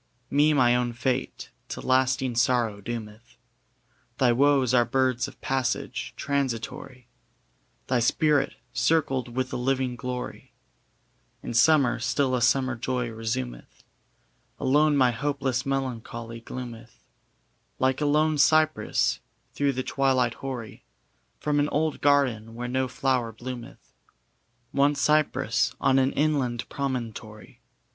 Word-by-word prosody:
] 125 0 -42
Me 145 +2 +4
my 125 -4 +4
own 125 -1 0
fate 125 +2 -3 0.2
to - - -5
lasting 130 0 +1
sorrow 120 -4 +1
doometh: 115 +1 -8 0.8
Thy 125 -2 +4
woes 135 0 +3
are 120 -1 +5
birds 130 0 0
of - - -13
passage, 130 -3 -2
transitory: 130 -2 -3 0.8
Thy 125 -1 +1
spirit, 145 +5 +2 0.2
circled 130 -7 0
with 130 0 -2
a - - -1
living 130 0 0
glory, 125 -1 -6 0.9
In - - -5
summer 135 0 +4
still 130 +3 0
a 125 - +1
summer 130 +2 +2
joy 125 0 -2
resumeth. 85 - -5 0.8
Alone 145 +2 +3
my 130 -2 +4
hopeless 135 0 -2
melancholy 115 -3 -4
gloometh, 120 -1 -9 0.7
Like 130 +2 +1
a 150 - +2
lone 150 +1 +2
cypress, 155 +2 +3 0.3
through 140 -1 +1
the 130 0 -3
twilight 130 -4 +1
hoary, 125 -5 -7 0.6
From 150 -1 0
an 145 +1 +1
old 155 +1 -1
garden 125 -6 +2
where 120 +1 -4
no 130 +1 0
flower 125 -2 0
bloometh, 120 +1 -9 0.8
One 140 +1 +3
cypress 150 +1 +1
on 135 0 +3
an 135 +1 +2
inland 135 -6 0
promontory. 115 -6 -5
130 Hz, 120 wpm, -26 LUFS, 120-140 Hz, 0.9 s, are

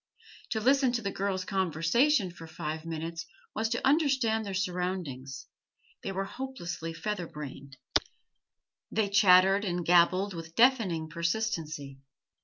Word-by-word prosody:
To 220 - -1
listen 265 +2 +3
to 240 -2 -1
the 200 - -1
girls' 190 -1 -2
conversation 190 - +2
for 165 -1 -11
five 155 0 -5
minutes 165 +1 -5 0.3
was 220 0 -1
to 240 +2 0
understand 265 -7 +2
their 195 - -3
surroundings; 180 -8 -3 0.6
they - - -4
were 195 0 -2
hopelessly 195 -9 -5
feather 175 +2 -3
brained, 140 -2 -9 1.1
they 210 -2 +1
chattered 195 0 +6
and 175 -3 -2
gabbled 185 +3 +4
with 165 -1 -8
deafening 225 -11 +3
persistency. 165 -5 -3
185 Hz, 125 wpm, -29 LUFS, 165-220 Hz, 1.1 s, chattered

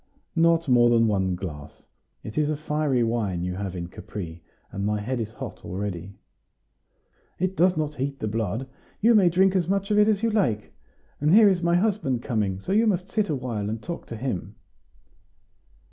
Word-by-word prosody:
"Not 165 -1 +3
more 120 -2 +5
than 115 -1 +4
one 95 -3 +1
glass; 75 -6 -8 0.4
it 110 - -8
is 150 -1 +1
a 155 - -1
fiery 150 -4 0
wine 105 -7 -1
you 90 0 -2
have 95 0 -4
in 85 -1 -4
Capri, 85 -2 -8 0.3
and 100 - -4
my 105 +1 0
head 120 +4 -3
is 110 -1 -4
hot - - -8
already." 95 0 -5 1.2
"It 185 +1 -1
does 180 -1 +3
not 150 -1 -1
heat 135 +1 -2
the 110 - -3
blood; 110 +3 -2 0.3
you 230 +3 +5
may 195 -5 +6
drink 190 +2 +3
as 175 -3 +1
much 195 +2 0
of 210 - +4
it 210 - +5
as 215 0 +1
you 230 - +2
like. 115 - 0 0.5
And 150 +5 +4
here 220 -1 +8
is 185 -3 +1
my 170 0 +2
husband 175 - 0
coming; 105 -6 -1
so 185 - -5
you 220 +3 +4
must 190 -2 0
sit 215 -2 0
a 150 - +1
while, 115 -6 -3
and 110 +1 -3
talk 170 +8 -7
to 115 - -6
him." 120 -6 -4
130 Hz, 195 wpm, -25 LUFS, -, 1.2 s, here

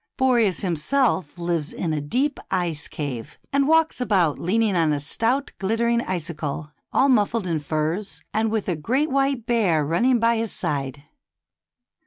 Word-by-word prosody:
Boreas 235 - +2
himself 185 - 0
lives 170 -3 -2
in 165 -3 -2
a 150 - -1
deep 260 - -1
ice 170 -5 0
cave, 135 -7 -6 0.2
and 280 0 +3
walks 320 -3 +3
A - - +3
WINDY 245 - -8
STORY. 185 - +5
83 - - -2
about - - -10
leaning 210 +3 +1
on 160 -3 +2
a 145 - -1
stout, 230 - 0
glittering 235 +4 +1
icicle 155 -5 -4 0.2
all 270 - +3
muffled 225 -4 +2
in 165 -3 -1
furs, 155 +7 -3
and 220 +1 +1
with 220 -2 -2
a 180 - 0
great 255 - 0
w^hite 270 -3 0
bear 185 -11 +2
running 240 - +2
by 230 0 +3
his 225 -1 -2
side. 140 -4 -3
195 Hz, 175 wpm, -23 LUFS, 155-235 Hz, 0.2 s, STORY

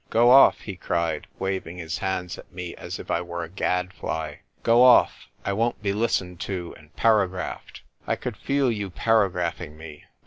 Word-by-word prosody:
"Go 120 +2 +5
off!" 135 +1 +7
he 100 -4 -7
cried, 85 -4 -2
waving 95 -2 -3
his 80 -1 -4
hands 90 -2 -3
at - - -14
me 90 -1 -6
as - - -7
if - - -7
I 85 - +1
were 85 0 -5
a 80 - -7
gadfly. 90 -5 -2
" - - -40
Go 115 +1 +5
off! 125 -1 +5 0.2
I 100 - 0
won't 115 +1 -1
be 100 -1 0
listened 95 -5 -1
to 90 -3 -4
and 75 0 -18
paragraphed. 100 -5 0 0.2
I - - +1
could - - -5
feel 140 -2 +1
you 105 -3 -3
paragraphing 90 -6 0
me. 80 -2 -11
90 Hz, 180 wpm, -25 LUFS, 85-110 Hz, 0.2 s, off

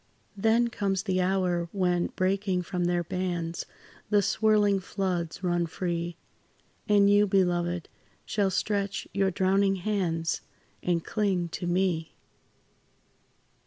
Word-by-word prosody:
Then 225 +4 +3
comes 195 -3 -1
the 185 -1 0
hour, 180 -2 0
when, 180 -3 +1
breaking 190 -1 0
from 180 0 -2
their 175 0 +1
bands, 175 -1 -3 0.4
The 205 -1 +4
swirling 210 -1 +3
floods 180 -3 -3
run 175 -1 +1
free, 170 0 -3 0.7
And 205 -1 +5
you, 205 +1 +5
beloved, 175 -3 +1 0.4
shall 200 -2 +1
stretch 200 +1 -1
your 195 -1 +2
drowning 195 +1 +2
hands, 175 -4 -1 0.4
And 170 -2 0
cling 190 -5 0
to 175 +2 -4
me. 175 -2 0
185 Hz, 115 wpm, -28 LUFS, 175-200 Hz, 0.7 s, And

